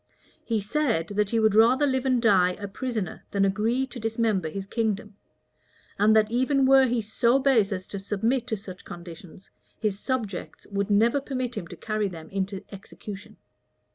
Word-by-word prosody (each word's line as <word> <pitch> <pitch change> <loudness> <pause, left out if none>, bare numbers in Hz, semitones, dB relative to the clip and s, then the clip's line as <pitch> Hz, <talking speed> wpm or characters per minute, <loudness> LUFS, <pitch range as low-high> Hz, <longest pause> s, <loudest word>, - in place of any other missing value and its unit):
He 225 -2 0
said, 215 - 0
that 205 0 0
he 230 - +1
would 220 -2 +3
rather 240 +6 +5
live 260 -1 0
and 255 -2 +3
die 190 -6 +4
a 200 +2 -7
prisoner 220 -1 -4
than 200 -1 +2
agree 220 +7 +1
to 250 -1 -9
dismember 225 -6 0
his 195 +4 -5
kingdom; 215 -1 -2 0.8
and 215 +2 +5
that 215 0 +3
even 260 +3 +2
were 265 0 +6
he 235 -2 0
so 235 +4 +2
base 255 -7 +3
as 185 -1 -3
to 200 - -5
submit 225 +6 -1
to 220 - -1
such 190 -2 -10
conditions, 175 +1 -11 0.3
his 205 -2 -1
subjects 220 -7 -4
would 200 0 -1
never 230 +7 +3
permit 255 -3 -3
him 170 - -5
to - - -9
carry 215 -1 -2
them 165 -4 -9
into 195 0 -3
execution. 200 0 -10
215 Hz, 175 wpm, -26 LUFS, 195-245 Hz, 0.8 s, were